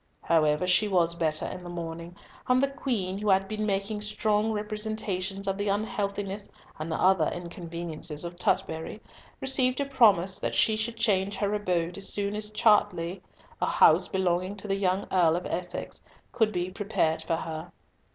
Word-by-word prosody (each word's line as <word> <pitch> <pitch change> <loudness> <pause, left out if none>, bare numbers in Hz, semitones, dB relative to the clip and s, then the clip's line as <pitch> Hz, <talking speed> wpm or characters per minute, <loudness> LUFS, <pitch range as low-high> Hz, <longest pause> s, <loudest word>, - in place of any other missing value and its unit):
However, 155 0 +2
she 185 +4 +3
was 175 -4 +2
better 155 -2 0
in 180 - -6
the 175 - -8
morning; 170 0 -6 0.3
and 255 0 +4
the 275 +1 +1
Queen, 200 -9 -2
who 210 0 -1
had 195 0 +3
been 215 +1 -2
making 200 +1 -1
strong 210 0 0
representations 210 -2 -2
of 195 +1 -1
the 205 0 0
unhealthiness 200 -1 -2 0.3
and 160 +2 -4
other 185 -1 +3
inconveniences 170 -2 -3
of 170 0 -6
Tutbury, 160 +1 -1 0.4
received 260 -1 +2
a 280 - +1
promise 205 -9 +4
that - - -2
she 220 - +3
should 225 +1 -3
change 200 -3 +1
her 205 0 -1
abode 180 -3 -1
as 195 - -1
soon 205 0 -1
as 210 0 -4
Chartley, 205 -5 +2 0.4
a - - +2
house - - +5
belonging 185 +1 0
to 205 +1 -8
the 195 - +1
young 195 0 0
Earl 170 -3 +4
of 175 - -3
Essex, 175 +1 -4 0.3
could 220 -2 +2
be 180 -1 -2
prepared 195 -5 0
for 165 - -1
her. 160 +1 -6
195 Hz, 170 wpm, -28 LUFS, 175-210 Hz, 0.4 s, house